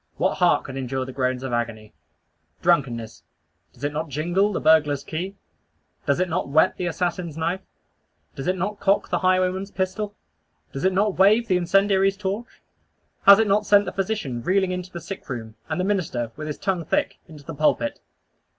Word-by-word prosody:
What -, -, 0 dB
heart 180 Hz, -1 st, +4 dB
could 135 Hz, 0 st, -7 dB
endure 130 Hz, 0 st, -2 dB
the 130 Hz, -, -8 dB
groans 130 Hz, -1 st, -1 dB
of 130 Hz, -2 st, -4 dB
agony! 110 Hz, -2 st, -3 dB, 0.7 s
Drunkenness: 125 Hz, -10 st, +1 dB, 0.5 s
Does 125 Hz, -, -17 dB
it 145 Hz, 0 st, -1 dB
not 155 Hz, +1 st, -3 dB
jingle 175 Hz, +8 st, +1 dB
the -, -, -2 dB
burglar's 150 Hz, -3 st, +3 dB
key? 180 Hz, +5 st, -5 dB, 0.7 s
Does 140 Hz, -, +2 dB
it 185 Hz, -, +2 dB
not 160 Hz, -, -2 dB
whet 160 Hz, +6 st, +4 dB
the 180 Hz, -, -2 dB
assassin's 170 Hz, -2 st, -2 dB
knife? 170 Hz, +4 st, -1 dB, 0.7 s
Does 135 Hz, -, -6 dB
it 185 Hz, +1 st, +1 dB
not 200 Hz, +3 st, -3 dB
cock 195 Hz, +1 st, +2 dB
the -, -, 0 dB
highwayman's 185 Hz, +1 st, +1 dB
pistol? 200 Hz, +2 st, -3 dB, 0.6 s
Does 135 Hz, -, -3 dB
it 190 Hz, -, +4 dB
not 200 Hz, 0 st, +1 dB
wave 215 Hz, +5 st, +5 dB
the 185 Hz, -, +2 dB
incendiary's 195 Hz, +2 st, +2 dB
torch? 205 Hz, +4 st, -5 dB, 0.6 s
Has 200 Hz, 0 st, +11 dB
it 220 Hz, -, +3 dB
not 205 Hz, +1 st, +2 dB
sent 205 Hz, 0 st, +5 dB
the -, -, -3 dB
physician 195 Hz, -, -2 dB
reeling 190 Hz, +6 st, +1 dB
into 180 Hz, 0 st, -4 dB
the 170 Hz, -, -6 dB
sick 190 Hz, 0 st, -8 dB
room; 115 Hz, -4 st, -5 dB, 0.2 s
and 155 Hz, +2 st, -2 dB
the -, -, +1 dB
minister, 165 Hz, -, -1 dB
with 155 Hz, 0 st, -6 dB
his 150 Hz, -, -4 dB
tongue 185 Hz, -3 st, -1 dB
thick, 155 Hz, -, -1 dB
into 155 Hz, -4 st, -13 dB
the 165 Hz, -, -7 dB
pulpit? 145 Hz, -6 st, +1 dB
175 Hz, 185 wpm, -24 LUFS, 140-195 Hz, 0.7 s, Has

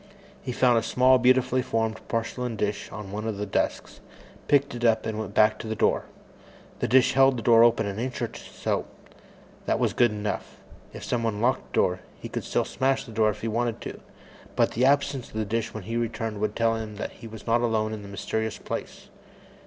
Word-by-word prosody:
He 130 Hz, -, -4 dB
found 120 Hz, -1 st, +4 dB
a -, -, -3 dB
small, 130 Hz, +2 st, +4 dB
beautifully 130 Hz, +1 st, +3 dB
formed 110 Hz, -2 st, -1 dB
porcelain 115 Hz, +1 st, -2 dB
dish 105 Hz, -1 st, -2 dB
on 105 Hz, -2 st, -7 dB
one 105 Hz, +2 st, -4 dB
of 110 Hz, -3 st, -3 dB
the 105 Hz, -, -2 dB
desks, 100 Hz, -, -2 dB, 0.5 s
picked 140 Hz, -2 st, +3 dB
it 120 Hz, 0 st, -6 dB
up, 110 Hz, -2 st, +3 dB
and 110 Hz, -1 st, -3 dB
went 105 Hz, -2 st, -5 dB
back 110 Hz, 0 st, +4 dB
to -, -, -6 dB
the 110 Hz, -, -2 dB
door. -, -, +1 dB, 0.7 s
The -, -, 0 dB
dish 130 Hz, 0 st, +4 dB
held 135 Hz, -1 st, +5 dB
the 115 Hz, -, -5 dB
door 115 Hz, -1 st, +7 dB
open 120 Hz, -2 st, +4 dB
an 100 Hz, +1 st, -4 dB
inch 125 Hz, +1 st, -3 dB
or -, -, -2 dB
so. -, -, -3 dB, 0.8 s
That -, -, +2 dB
was -, -, +1 dB
good 120 Hz, -1 st, +4 dB
enough. 105 Hz, -1 st, -4 dB, 0.3 s
If -, -, -9 dB
someone 115 Hz, -3 st, -1 dB
locked 125 Hz, +4 st, +1 dB
the -, -, -4 dB
door, 90 Hz, 0 st, +2 dB, 0.2 s
he -, -, -7 dB
could -, -, -4 dB
still -, -, 0 dB
smash 135 Hz, 0 st, 0 dB
in 115 Hz, -, -10 dB
the 110 Hz, -, -5 dB
glass 110 Hz, -1 st, +3 dB
if 105 Hz, -, -14 dB
he 115 Hz, -, -2 dB
wanted 115 Hz, +1 st, -1 dB
to, -, -, -7 dB, 0.6 s
but -, -, +3 dB
the 125 Hz, +3 st, +2 dB
absence 140 Hz, -2 st, +2 dB
of -, -, -16 dB
the 110 Hz, -1 st, -1 dB
dish 115 Hz, +2 st, -2 dB
when 110 Hz, -, -7 dB
he 115 Hz, +5 st, -3 dB
returned 115 Hz, -2 st, -2 dB
would 105 Hz, 0 st, -1 dB
tell 115 Hz, 0 st, +2 dB
him 110 Hz, -1 st, -6 dB
that 105 Hz, -, -5 dB
he 115 Hz, -, -11 dB
was 110 Hz, -1 st, -10 dB
not 120 Hz, +1 st, +2 dB
alone 110 Hz, -2 st, 0 dB
in 110 Hz, -, -6 dB
this 100 Hz, -, -10 dB
mysterious 110 Hz, +2 st, -3 dB
place. -, -, -6 dB
115 Hz, 225 wpm, -26 LUFS, 110-120 Hz, 0.8 s, door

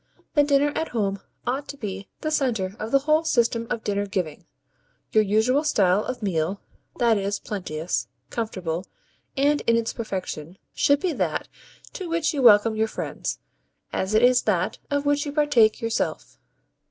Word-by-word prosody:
The 295 Hz, -, +5 dB
'dinner 285 Hz, 0 st, +3 dB
at 320 Hz, -, -1 dB
home' 200 Hz, -4 st, -1 dB, 0.3 s
ought 265 Hz, +4 st, -2 dB
to 285 Hz, -, -7 dB
be 195 Hz, -4 st, -6 dB
the 310 Hz, -, -2 dB
centre 225 Hz, -10 st, 0 dB
of 220 Hz, -, -4 dB
the 275 Hz, -, +5 dB
whole 310 Hz, +1 st, +3 dB
system 235 Hz, -6 st, +1 dB
of 230 Hz, -2 st, -3 dB
dinner 205 Hz, 0 st, -1 dB
giving. 180 Hz, -7 st, -3 dB, 0.6 s
Your 215 Hz, -, +5 dB
usual 220 Hz, +8 st, +2 dB
style 200 Hz, -, +3 dB
of 255 Hz, -3 st, -5 dB
meal 185 Hz, 0 st, -1 dB, 0.4 s
that 230 Hz, -3 st, +3 dB
is, 200 Hz, +1 st, -1 dB
plenteous, 175 Hz, -5 st, -3 dB, 0.2 s
comfortable, 185 Hz, -6 st, -3 dB, 0.5 s
and 290 Hz, +2 st, +3 dB
in 230 Hz, 0 st, +5 dB
its 230 Hz, -1 st, -1 dB
perfection 185 Hz, -6 st, -5 dB, 0.2 s
should 285 Hz, 0 st, +3 dB
be 365 Hz, -4 st, 0 dB
that 180 Hz, -, -1 dB, 0.5 s
to 370 Hz, -3 st, -5 dB
which 330 Hz, -1 st, +1 dB
you 285 Hz, -, -1 dB
welcome 220 Hz, -2 st, +6 dB
your 220 Hz, +1 st, +1 dB
friends, -, -, -4 dB, 0.6 s
as 190 Hz, +3 st, -1 dB
it 220 Hz, -, +4 dB
is 250 Hz, 0 st, +6 dB
that 185 Hz, -4 st, 0 dB
of 285 Hz, 0 st, 0 dB
which 290 Hz, +1 st, +1 dB
you -, -, -3 dB
partake 280 Hz, -7 st, +3 dB
yourself. 230 Hz, 0 st, -2 dB
225 Hz, 165 wpm, -24 LUFS, 195-280 Hz, 0.6 s, welcome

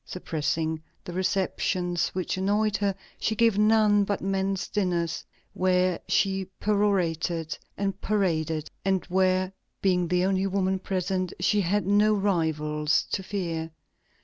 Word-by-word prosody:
Suppressing 160 Hz, -2 st, -2 dB, 0.2 s
the 175 Hz, -, -7 dB
receptions 180 Hz, -1 st, 0 dB
which 185 Hz, -2 st, -1 dB
annoyed 205 Hz, +2 st, +1 dB
her, 200 Hz, -1 st, 0 dB, 0.2 s
she 220 Hz, -, 0 dB
gave 225 Hz, -2 st, +3 dB
none 210 Hz, -1 st, +5 dB
but 200 Hz, 0 st, -1 dB
men's 195 Hz, 0 st, -1 dB
dinners, 175 Hz, -4 st, -1 dB, 0.3 s
where 185 Hz, -1 st, +2 dB
she 195 Hz, -1 st, +1 dB
perorated 175 Hz, -6 st, 0 dB, 0.2 s
and 195 Hz, -1 st, -2 dB
paraded, 160 Hz, -7 st, 0 dB, 0.2 s
and 190 Hz, -1 st, +1 dB
where, 185 Hz, 0 st, +2 dB, 0.3 s
being 180 Hz, -2 st, +2 dB
the 180 Hz, +1 st, +2 dB
only 190 Hz, 0 st, +1 dB
woman 190 Hz, -1 st, 0 dB
present, 185 Hz, -1 st, -2 dB
she 205 Hz, +3 st, +2 dB
had 200 Hz, +2 st, 0 dB
no 210 Hz, +2 st, +4 dB
rivals 155 Hz, -6 st, +1 dB
to -, -, 0 dB
fear. 175 Hz, -5 st, -3 dB
185 Hz, 125 wpm, -27 LUFS, 175-200 Hz, 0.3 s, none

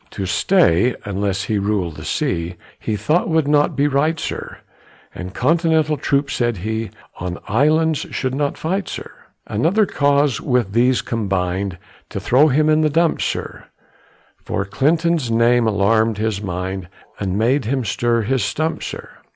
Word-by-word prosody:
To 95 Hz, -, -5 dB
stay, 120 Hz, -, +3 dB
unless 100 Hz, -1 st, -1 dB
he 105 Hz, -1 st, -1 dB
rul'd 100 Hz, -5 st, -1 dB
the 80 Hz, -, -8 dB
sea, 85 Hz, +2 st, -2 dB, 0.2 s
He 110 Hz, -, -2 dB
thought 150 Hz, -, +1 dB
would 160 Hz, -3 st, +2 dB
not 145 Hz, 0 st, +3 dB
be 145 Hz, 0 st, +2 dB
right, 150 Hz, +4 st, +1 dB
sir, -, -, -5 dB, 0.6 s
And 90 Hz, +1 st, -7 dB
Continental 160 Hz, -, +2 dB
troops, 140 Hz, 0 st, 0 dB
said 120 Hz, -3 st, 0 dB
he, 110 Hz, +3 st, -3 dB, 0.3 s
On 90 Hz, -1 st, -4 dB
islands 155 Hz, +7 st, +2 dB
should 130 Hz, -1 st, -2 dB
not 140 Hz, +1 st, -1 dB
fight, 190 Hz, +4 st, -2 dB
sir. -, -, -7 dB, 0.3 s
Another 175 Hz, -, +2 dB
cause 145 Hz, -4 st, +1 dB
with 125 Hz, -7 st, 0 dB
these 125 Hz, +2 st, +3 dB
combin'd 95 Hz, -4 st, -2 dB, 0.3 s
To -, -, -4 dB
throw 130 Hz, +9 st, +4 dB
him 155 Hz, +2 st, +2 dB
in 155 Hz, 0 st, +4 dB
the 155 Hz, -, +3 dB
dumps, 165 Hz, +2 st, +1 dB
sir, -, -, -4 dB, 0.8 s
For 95 Hz, -, -2 dB
Clinton's 155 Hz, -, +1 dB
name 115 Hz, +1 st, +3 dB
alarmed 110 Hz, +1 st, +2 dB
his 105 Hz, -1 st, -1 dB
mind, 95 Hz, -1 st, -4 dB, 0.3 s
And 95 Hz, -1 st, -2 dB
made 120 Hz, +4 st, +2 dB
him 130 Hz, +1 st, -1 dB
stir 115 Hz, +2 st, +1 dB
his 130 Hz, 0 st, 0 dB
stumps, 155 Hz, +9 st, -2 dB
sir. -, -, -7 dB
120 Hz, 155 wpm, -20 LUFS, 100-150 Hz, 0.8 s, throw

